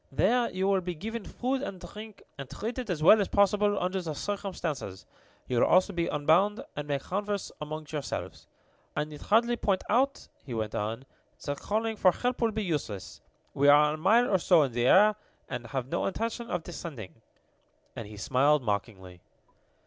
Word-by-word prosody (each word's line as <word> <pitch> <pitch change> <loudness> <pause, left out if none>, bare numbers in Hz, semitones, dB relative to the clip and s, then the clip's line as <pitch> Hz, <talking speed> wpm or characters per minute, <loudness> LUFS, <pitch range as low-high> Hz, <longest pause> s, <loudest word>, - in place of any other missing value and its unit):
"There 235 - +2
you 190 +1 -1
will 195 -1 +2
be 180 -1 -4
given 225 +7 -5
food 260 +5 -2
and 195 -10 -5
drink, 210 +2 -10
and 140 -2 -8
treated 235 +1 -5
as 160 -4 -2
well 210 +6 +8
as 195 - 0
possible 205 0 +3
under 185 +1 -1
the 160 -4 -5
circumstances. 170 - -4 0.4
You 125 -2 0
will - - +4
also 185 +3 +4
be 170 -1 -1
unbound, 170 +8 +2
and 145 0 -5
may 145 -1 0
converse 200 +7 -3
among 155 +1 -5
yourselves. 150 -3 -5 0.5
I - - +1
need 150 -1 -10
hardly 235 +3 +2
point 195 -4 0
out," 265 +5 +1 0.2
he 125 - -6
went 110 -1 -3
on, 110 +5 -3 0.4
"that 145 -1 -3
calling 220 +1 -1
for 185 -3 +4
help 245 0 -2
will 230 - +3
be 215 0 -2
useless. 145 - -4 0.3
We 140 +1 +2
are 150 +1 +6
a - - -4
mile 220 +9 +4
or 190 - +2
so 170 -2 +5
in 135 - -2
the 120 +1 +1
air, 210 +5 +6 0.3
and 120 - -5
have 135 -3 -3
no - - -1
intention 230 +3 -3
of 165 - -2
descending," 140 - -8 0.7
and 115 - -6
he 105 0 -11
smiled 140 +6 +2
mockingly. 95 -4 -4
180 Hz, 185 wpm, -29 LUFS, 140-210 Hz, 0.7 s, well